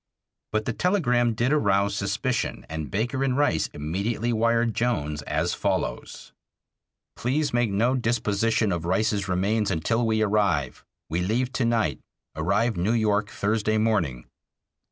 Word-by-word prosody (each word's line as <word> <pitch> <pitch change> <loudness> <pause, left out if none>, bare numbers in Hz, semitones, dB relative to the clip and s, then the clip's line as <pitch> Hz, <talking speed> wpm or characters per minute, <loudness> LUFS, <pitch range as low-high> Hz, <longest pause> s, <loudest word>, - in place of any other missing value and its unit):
But 110 0 -1
the 115 - -1
telegram 125 - +1
did 120 +6 +1
arouse 100 -7 +2
suspicion, - - -2
and 80 -1 -5
Baker 120 +6 -1
and 130 -1 0
Rice 145 - +2
immedately 100 +10 -2
wired 115 0 +2
Jones 75 -13 -1
as 80 +3 0
follows: - - -3 0.8
Please 145 +4 -1
make 120 -2 +2
no 110 +6 +2
disposition 115 -3 +1
of 85 -2 -2
Rice's 100 +2 0
remains 100 +4 +1
until 105 +7 0
we 110 -1 +2
arrive. 100 -10 0 0.3
We 85 +2 0
leave 120 +7 0
to 130 - 0
night, 110 - +1 0.4
arrive 100 +7 +1
New 95 +6 +1
York 105 -2 +1
Thursday 110 0 0
morning. 85 - 0
110 Hz, 135 wpm, -25 LUFS, 95-120 Hz, 0.8 s, arouse